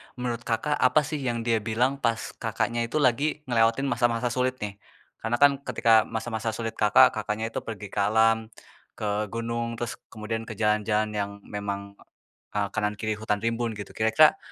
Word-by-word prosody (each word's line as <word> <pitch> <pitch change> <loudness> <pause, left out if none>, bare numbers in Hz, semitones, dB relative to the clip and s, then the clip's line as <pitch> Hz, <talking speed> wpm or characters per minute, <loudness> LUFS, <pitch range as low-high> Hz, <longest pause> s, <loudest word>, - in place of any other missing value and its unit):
menurut 120 -2 -3
Kakak 145 +6 0
apa 130 +4 +5
sih 150 +1 -4
yang 115 -1 -1
dia 115 -1 +2
bilang 120 +6 0
pas 115 -3 -1
Kakaknya 115 +1 -1
itu 120 - -8
lagi 130 +1 +3 0.2
ngelewatin 115 +2 +3
masa-masa 120 0 +1
sulit, 130 +1 0
nih? 100 -1 -6 0.4
Karena 115 +2 -1
kan 145 - +8 0.2
ketika 115 - +1 0.2
masa-masa 115 0 -3
sulit 115 -1 -4
Kakak, 125 +5 +6
Kakaknya 110 +1 -3
itu - - -2
pergi 105 -2 -6
ke - - -3
alam, 110 +1 +3 0.5
ke 105 0 -1
gunung, 115 +1 -3
terus 120 0 -5
kemudian 115 +1 -4
ke 110 - -5
jalan-jalan 105 0 +1
yang 100 -1 -2
memang, 100 -1 -5 0.6
eee, 100 -1 +1
kanan 105 0 0
kiri 110 -1 -2
hutan 105 -1 -1
rimbun, 115 0 -1
gitu, 100 -2 -7
kira-kira 110 +8 +5
115 Hz, 170 wpm, -26 LUFS, 105-120 Hz, 0.6 s, kan